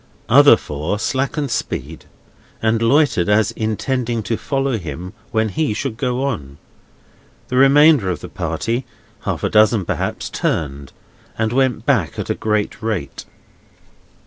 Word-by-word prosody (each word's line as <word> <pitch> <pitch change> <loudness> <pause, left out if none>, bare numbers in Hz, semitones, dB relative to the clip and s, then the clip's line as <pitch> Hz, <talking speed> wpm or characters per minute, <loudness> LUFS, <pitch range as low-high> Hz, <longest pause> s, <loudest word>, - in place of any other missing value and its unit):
Other - - +7
four 75 +7 -3
slackened 135 +4 -1
speed, 115 - -4 0.5
and 110 0 +1
loitered 120 - +3
as 105 +1 +3
intending 115 +1 -2
to 115 +4 -1
follow 135 -1 -1
him 85 +3 -7 0.2
when 110 -1 0
he 150 -1 -1
should 130 -2 -3
go 125 +1 -1
on. 75 - -4 0.9
The 125 - -1
remainder 140 -4 +6
of 90 - -2
the - - -7
party 120 +3 -2 0.4
(half - - -2
a - - +1
dozen 110 -2 +4
perhaps) - - -3
turned, 70 -2 -2 0.5
and 110 +1 0
went 130 -3 +1
back 115 - +1
at - - -3
a - - +2
great 105 -1 -2
rate. 105 -11 -4
110 Hz, 140 wpm, -19 LUFS, 100-130 Hz, 0.9 s, Other